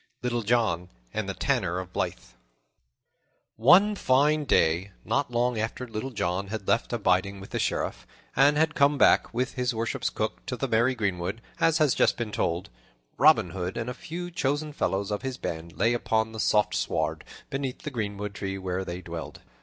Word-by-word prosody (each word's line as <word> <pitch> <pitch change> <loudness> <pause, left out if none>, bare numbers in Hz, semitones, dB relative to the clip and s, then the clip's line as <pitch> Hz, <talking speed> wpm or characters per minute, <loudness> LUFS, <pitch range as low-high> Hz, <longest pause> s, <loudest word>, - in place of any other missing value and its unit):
Little 120 -1 0
John 105 -6 +1 0.2
and - - -2
the - - -3
Tanner 85 +2 0
of 90 0 -6
Blyth - - -3 1.2
ONE 180 - +6
FINE 150 0 +3
DAY, 90 - +2
not 140 -1 0
long 120 -1 0
after 115 +3 -3
Little 110 +3 -4
John 100 -5 -2
had 105 -1 -5
left 115 - +1
abiding 100 -3 +1
with 95 - -11
the - - -2
Sheriff - - -2 0.3
and 145 +2 +5
had 160 0 +2
come 140 0 +3
back, - - +4
with 125 +2 -1
his 125 -2 -1
worship's 115 +1 -1
cook, - - -3
to - - -3
the - - -1
merry 120 +3 +2
greenwood, 95 -1 -2 0.2
as 165 -1 +4
has 155 -5 +3
just - - +2
been 115 -3 -3
told, 85 -2 -1 0.5
Robin 125 - +5
Hood 90 +2 -4
and 120 +1 -2
a - - -5
few 175 +6 -6
chosen 150 -1 -1
fellows 100 -6 -1
of 105 - -2
his 130 -1 -4
band 80 -4 -6
lay 115 +6 +3
upon 110 -2 0
the 110 - -7
soft 105 -1 +2
sward - - -1 0.3
beneath 135 -2 -3
the 150 - -4
greenwood 105 -4 -3
tree 95 -1 -4
where 95 0 -3
they 90 0 -6
dwelled. 85 -2 -7
115 Hz, 185 wpm, -27 LUFS, 95-130 Hz, 1.2 s, ONE